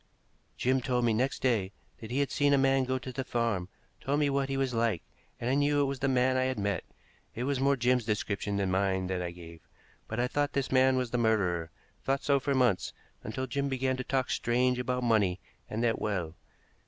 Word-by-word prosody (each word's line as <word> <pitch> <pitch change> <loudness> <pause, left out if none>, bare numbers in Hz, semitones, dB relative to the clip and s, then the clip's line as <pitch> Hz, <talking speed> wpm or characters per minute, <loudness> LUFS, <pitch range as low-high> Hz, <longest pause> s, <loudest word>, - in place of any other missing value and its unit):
"Jim 130 +1 +1
told 125 -1 0
me 115 - +3
next 130 +5 -1
day 110 -7 +1 0.3
that 110 - -9
he 130 +4 0
had 140 - -1
seen 145 0 +3
a - - +5
man 135 0 +3
go 130 +1 0
to 130 0 -7
the 135 - -3
farm, 115 -8 -1 0.3
told 145 +2 0
me 145 -2 +2
what 140 0 0
he 135 - -1
was 135 -2 0
like, 115 -6 0 0.4
and 120 - -3
I 130 - +2
knew 145 +1 +2
it 140 - +3
was 135 -1 -3
the 135 - 0
man 130 0 +2
I 130 - +2
had 130 -2 -1
met. 100 -3 -1 0.5
It 120 - -3
was 135 0 0
more 140 +1 +3
Jim's 125 -1 +2
description 105 -2 -2
than 95 -2 0
mine 95 0 +1
that 90 0 -2
I 90 - -2
gave. 85 -2 -11 0.5
But 110 - -4
I 125 - +2
thought 145 +2 -1
this 140 -1 -1
man 130 0 +4
was 125 -2 -1
the 125 - 0
murderer, 90 -8 +1 0.3
thought 135 0 0
so 140 -1 +3
for 140 +1 -1
months, 120 -9 +2 0.3
until 130 +5 -3
Jim 140 +2 -2
began 130 0 0
to 130 - -4
talk 130 0 -1
strange 125 +1 +1
about 125 0 -1
money 105 -6 +2 0.3
and 110 +2 -2
that 115 -1 +1
well. 90 -7 -2
125 Hz, 230 wpm, -30 LUFS, 105-135 Hz, 0.5 s, a